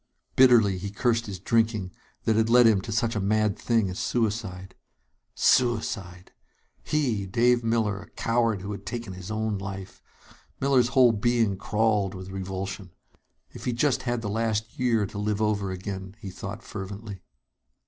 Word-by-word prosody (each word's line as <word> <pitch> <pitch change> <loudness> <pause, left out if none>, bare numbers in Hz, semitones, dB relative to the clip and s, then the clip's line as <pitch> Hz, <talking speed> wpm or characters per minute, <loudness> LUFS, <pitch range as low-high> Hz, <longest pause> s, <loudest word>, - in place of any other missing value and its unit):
Bitterly 115 -7 +5
he 100 +2 -4
cursed 115 +2 0
his 100 -2 -5
drinking, 110 -1 0 0.3
that 110 - +2
had 110 +1 +2
led 120 +1 +7
him 110 -4 +5
to 110 - -7
such 115 +1 0
a - - 0
mad 105 +1 +1
thing 115 -4 +1
as 90 0 -5
suicide. 105 -5 -2 0.6
Suicide! 105 -7 +1 0.5
He 120 -10 0
Dave 120 +4 +3
Miller 110 -3 0
a - - -14
coward 115 -3 0
who 100 - -5
had 100 - -6
taken 115 -5 -5
his 90 +1 -9
own 110 -1 -1
life! 95 -1 -7 0.6
Miller's 130 -3 +3
whole 125 -2 +7
being 115 -1 +1
crawled 105 -1 0
with 95 0 -8
revulsion. 95 0 -5 0.6
If - - -10
he 125 - 0
just 130 +1 +1
had 120 -2 -2
the - - -2
last 110 +1 -2
year 115 -4 +2
to 105 +1 -7
live 105 0 -1
over 105 -2 0
again, 95 +1 -6
he 100 -4 -7
thought 100 +4 -7
fervently. 100 -1 -7
105 Hz, 160 wpm, -26 LUFS, 95-115 Hz, 0.6 s, led